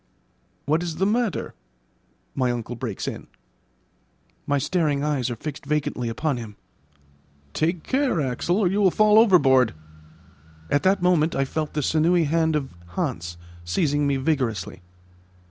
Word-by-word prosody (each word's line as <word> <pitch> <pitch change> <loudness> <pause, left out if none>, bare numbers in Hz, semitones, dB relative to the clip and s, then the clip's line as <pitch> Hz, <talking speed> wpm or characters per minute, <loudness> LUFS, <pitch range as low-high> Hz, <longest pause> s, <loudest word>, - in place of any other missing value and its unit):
"What 155 +3 +1
is 170 -2 -4
the 190 +4 0
matter?" 225 0 -1 0.8
my 130 -2 0
uncle 120 0 -4
breaks 115 -5 -5
in. - - -6 1.2
My 145 - +2
staring 145 -1 0
eyes 145 -5 0
are 120 - -3
fixed 145 +5 -7
vacantly 140 -5 -2
upon 140 +4 -1
him. 110 -3 -8 1.0
"Take 165 +1 -1
care, 265 - 0
Axel, 145 +6 0
or 205 -4 +2
you 200 +4 +1
will 195 - +5
fall 215 +3 +5
overboard." 135 - +4 1.0
At 145 - +3
that 190 -1 +2
moment 170 -3 +3
I 135 - +1
felt 155 +2 -4
the 150 - 0
sinewy 165 +4 +3
hand 160 +1 +1
of 135 -7 -3 0.2
Hans 85 +1 -3 0.3
seizing 145 - 0
me 140 -1 +1
vigorously. 130 - -2
150 Hz, 145 wpm, -24 LUFS, 130-175 Hz, 1.2 s, will